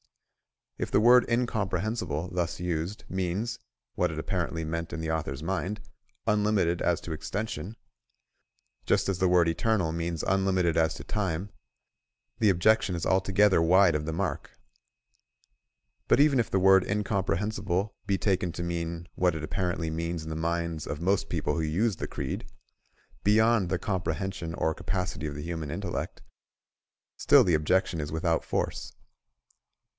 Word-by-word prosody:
If - - -2
the - - +3
word 120 +2 +6
incomprehensible, 105 -7 -1
thus 85 -1 -2
used, 90 +3 -3
means 95 +5 -2 0.3
(what 90 - +1
it 80 - -6
apparently 80 -1 -2
meant 85 +1 -3
in 85 - -4
the 80 0 -2
author's 75 -3 -3
mind) 95 +4 -2 0.5
unlimited 105 -5 +2
as 90 0 +1
to 85 - -7
extension, 105 +5 -4 1.1
just - - +2
as 95 -2 -1
the 95 - +3
word 90 -1 +4
eternal 90 0 +1
means 85 -1 -3
unlimited 95 -3 +1
as 80 -1 +2
to - - -8
time, 95 -2 -2 0.9
the 110 - +4
objection 100 +1 +3
is 85 - -3
altogether 95 0 +3
wide 90 +2 +5
of 75 0 -1
the - - -1
mark.. 90 +4 -4 1.5
But - - +4
even 145 -2 +5
if 115 - 0
the - - +1
word 95 0 +6
incomprehensible 100 -1 -1
be 100 -1 +2
taken 95 -3 0
to 85 - -4
mean 85 0 -4
(what 90 -2 +1
it 80 - -5
apparently 85 0 -2
means 85 0 -3
in 80 - -6
the - - -3
minds 85 -1 -2
of 75 - -4
most 95 +3 +1
people - - -1
who 80 - -1
use 90 +6 0
the - - -4
creed) - - -5 0.8
beyond 110 -2 +4
the 95 - +1
comprehension 95 -2 -3
or 80 - 0
capacity 90 -3 -3
of 75 - -5
the 75 - -6
human 80 -3 -4
intellect, 85 +2 -4 0.9
still - - +6
the 90 - +2
objection 80 +2 +1
is 75 0 -5
without 80 +1 0
force. - - -3
90 Hz, 150 wpm, -28 LUFS, 80-100 Hz, 1.5 s, word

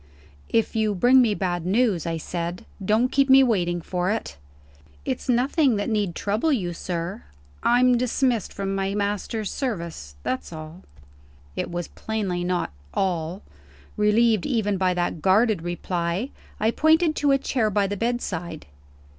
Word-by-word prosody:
"If 225 0 +1
you 215 -2 +1
bring 250 +7 +6
me 220 -4 +2
bad 175 -4 -2
news," 195 -2 +1
I 165 -1 -1
said, 170 +2 -4 0.2
"don't 220 +6 +2
keep 275 0 +3
me 265 0 +8
waiting 175 -8 +1
for 180 +2 -2
it." 215 - -2 0.7
"It's - - -3
nothing 255 +2 +3
that 205 +2 -2
need 205 -5 0
trouble 215 +10 0
You, 185 -10 0
sir. 170 - -4 0.4
I'm 245 0 +4
dismissed 245 -2 0
from 195 0 -3
my 195 0 -1
master's 205 +1 -2
service 170 - -4
that's 130 +5 -3
all." 155 +2 -9 0.7
It - - -3
was 175 0 -4
plainly 200 -5 -3
not 180 - -1 0.2
"all." 175 0 -1 0.5
Relieved 210 0 +3
even 220 -6 0
by 185 -1 +1
that 175 -2 -1
guarded 205 +1 +3
reply, 175 +5 -2 0.3
I 220 +2 +2
pointed 315 +3 +3
to 290 - +2
a 275 - +5
chair 245 -5 0
by 205 0 +1
the 200 +1 -2
bedside. 185 -8 -3
205 Hz, 150 wpm, -24 LUFS, 175-235 Hz, 0.7 s, me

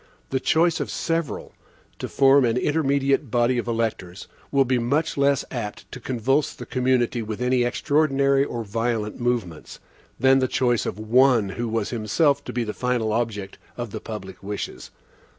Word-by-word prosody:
The 135 - +1
choice 165 +3 +2
of - - -3
SEVERAL, 165 -3 -3 0.5
to - - -4
form 135 0 +5
an 115 0 +1
intermediate 140 -2 +1
body 120 +2 +2
of 120 - -4
electors, 110 -6 -3 0.2
will 140 -1 +3
be 130 0 +1
much 140 +7 0
less 140 -1 +2
apt 110 -5 -6
to 130 - -7
convulse 130 +4 0
the - - -8
community 125 -2 +1
with 110 -1 -5
any 125 0 +2
extraordinary 140 +1 +2
or 120 -4 -4
violent 115 0 -2
movements, 115 -10 -3 0.4
than 135 +2 +5
the 130 - +1
choice 120 -2 +1
of - - -4
ONE 115 0 +3
who 120 +4 -3
was 110 -2 -2
himself 125 +6 +1
to - - -5
be 120 - -1
the 105 -2 -4
final 120 -4 -1
object 105 -4 -3 0.2
of 120 -3 -5
the - - -6
public 95 -4 -8
wishes. 100 +1 -6
120 Hz, 170 wpm, -24 LUFS, 110-135 Hz, 0.5 s, form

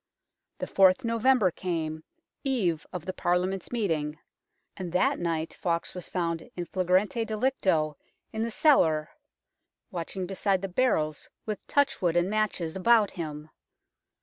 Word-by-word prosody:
The - - -3
4th 190 +5 +4
November 230 -3 +3
came, 160 -3 -3 0.4
eve 190 - 0
of 180 -3 -6
the 185 - -3
Parliament's 180 +2 -1
meeting, 160 -10 -1 0.6
and 180 -3 -5
that 180 - +2
night 165 -2 -2
Fawkes 170 -2 -2
was 180 - -8
found 170 -2 -2
in 175 - -3
flagrante 185 +6 +1
delicto 210 - 0 0.4
in 220 - -2
the 230 - 0
cellar, 165 - +3 0.8
watching 180 +2 -4
beside 195 0 0
the - - -1
barrels 175 - 0 0.2
with 215 -2 -5
touch 285 -1 +2
wood 175 -2 +1
and 175 +3 +2
matches 205 -6 -1
about 210 +2 +4
him. 155 -2 -6
185 Hz, 135 wpm, -28 LUFS, 165-215 Hz, 0.8 s, 4th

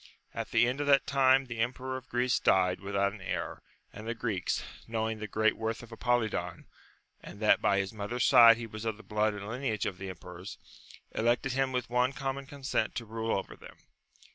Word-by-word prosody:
At - - -4
the 120 - +4
end 130 +4 -1
of 145 - -2
that 140 -1 +5
time 135 -1 +4
the 120 -3 -7
emperor 130 +2 -2
of 130 -1 -8
Greece 125 +1 +1
died 90 -1 +3
without 100 +1 0
an 105 - -11
heir, 95 - -4 0.3
and 110 +2 -9
the 115 - -2
Greeks, 105 -6 -2 0.2
knowing 110 -1 -2
the 110 - -5
great 110 +1 +2
worth 110 +1 -3
of 120 - -13
Apolidon, 120 -1 -1 0.6
and 100 - -11
that 105 -1 +4
by 100 - +3
his 100 +2 -1
mother's 110 +4 -2
side 115 -3 +8
he 115 - -5
was 110 -1 -8
of 110 -2 -2
the 110 - -13
blood 105 +1 0
and 100 0 -7
lineage 115 -3 -2
of 95 -3 -4
the 95 - -5
emperors, 90 +1 -9 0.5
elected 120 +4 +1
him 135 0 0
with 125 -2 -3
one 125 +2 +2
common 135 0 -4
consent 135 -6 -2
to 115 - -4
rule 115 0 -2
over 95 - -6
them. - - -14
115 Hz, 205 wpm, -30 LUFS, 105-125 Hz, 0.6 s, side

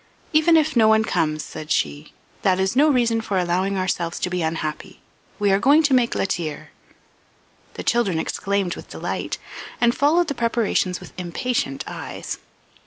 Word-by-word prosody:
"Even 320 +2 +5
if 310 -1 +1
no 225 -2 +5
one 220 0 +5
comes," 155 -7 0
said 155 +1 -8
she, 70 -1 -1 0.3
"that 190 -1 +2
is 190 +4 0
no 295 +4 +5
reason 235 -4 +2
for 205 -3 -2
allowing 185 +2 0
ourselves 175 -2 -1
to 180 - -1
be 180 -1 -1
unhappy. 160 -1 -4 0.4
We 205 -2 +2
are 195 - +3
going 285 +8 +5
to 290 -3 +2
make 245 -2 +3
la - - +1
tire." 165 -5 -4 1.0
The - - -5
children 235 -8 +1
exclaimed 195 +2 -1
with - - -11
delight, - - -4 0.4
and 235 0 +4
followed 310 +7 +3
the 285 - -1
preparations 230 -6 0
with - - -12
impatient 175 - -2
eyes. - - -6
200 Hz, 170 wpm, -22 LUFS, 175-245 Hz, 1.0 s, Even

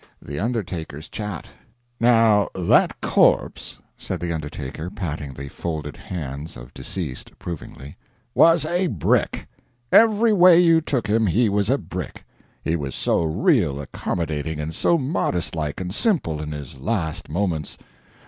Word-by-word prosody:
THE 70 - -6
UNDERTAKER'S 90 - -3
CHAT 105 -6 -5 0.5
"Now 115 -3 +4
that 90 -2 +3
corpse," - - +2 0.2
said - - -4
the 85 -1 -2
undertaker, 75 +1 -5
patting 80 -8 -5
the 70 +1 -7
folded 75 -2 -5
hands 75 -4 -6
of - - -12
deceased 70 0 -6
approvingly, 70 -4 -9 0.4
"was 165 -1 +5
a 175 +3 +1
brick 95 - 0 0.5
every 225 0 +5
way 180 -3 +7
you 165 -2 +5
took 130 -7 -1
him 110 0 +2
he 110 +6 +3
was 100 +1 +1
a 135 - +3
brick. 95 - -7 0.4
He 80 - 0
was 70 -4 -4
so - - +1
real 85 - +2
accommodating, 75 +1 -3
and 75 +2 -4
so 170 - +2
modest 130 - -1
like 75 -2 -3
and 90 -1 -4
simple 110 - 0
in 75 0 -5
his 70 -3 -8
last 85 - -2
moments. 80 -3 -2
85 Hz, 140 wpm, -23 LUFS, 75-115 Hz, 0.5 s, way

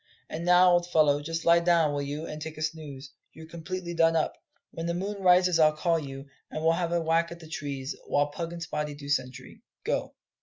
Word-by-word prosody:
And 165 - -4
now, 180 +1 +6
old 175 0 +2
fellow, 150 -4 +3
just 165 +2 -4
lie 170 0 +6
down, 170 -3 +3
will 145 - -1
you, 145 +3 -4
and 155 0 -7
take 160 0 -6
a 155 - -4
snooze: 150 -4 -6 0.2
you're 160 - -11
completely 170 +2 -6
done 165 -1 +3
up. 160 - 0 0.4
When 165 0 -5
the 170 - -1
moon 200 +2 -4
rises 180 -2 +5
I'll 155 -1 +4
call 165 0 +1
you, 135 -2 -8 0.2
and 155 - -5
we'll 165 0 +4
have 170 0 -1
a 170 - +2
whack 165 +1 +1
at 170 - -8
the 160 - -12
trees, 140 -3 -5
while 145 0 +1
Pug 165 +2 -5
and 170 -1 -6
Spottie 150 -2 -4
do 140 -1 -9
sentry 130 -3 -3 0.2
go." - - -2
160 Hz, 225 wpm, -28 LUFS, 150-170 Hz, 0.4 s, now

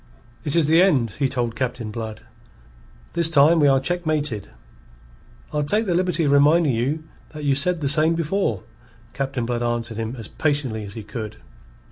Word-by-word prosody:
"It 145 -1 -1
is 165 -3 +4
the 160 +3 +5
end," 135 - +3
he 135 -2 +2
told 120 -3 -2
Captain 125 -4 -3
Blood. 110 -1 -6 0.9
"This 170 -1 +4
time 160 +2 +5
we 145 - +5
are 135 -1 +4
checkmated." 155 - -2 1.0
"I'll 150 - 0
take 210 +10 0
the 185 - 0
liberty 180 -1 +1
of 145 - +2
reminding 145 +1 +4
you 135 +7 -1 0.3
that 150 -1 -7
you 140 -1 +2
said 165 +5 +2
the 140 - 0
same 155 +3 +3
before," 165 - -1 0.5
Captain 135 -3 -3
Blood 120 0 -2
answered 120 -1 -2
him 115 +2 -4
as 115 -3 -6
patiently 140 -8 -1
as 100 - -8
he 110 - -6
could. 105 0 -7
140 Hz, 175 wpm, -22 LUFS, 120-160 Hz, 1.0 s, the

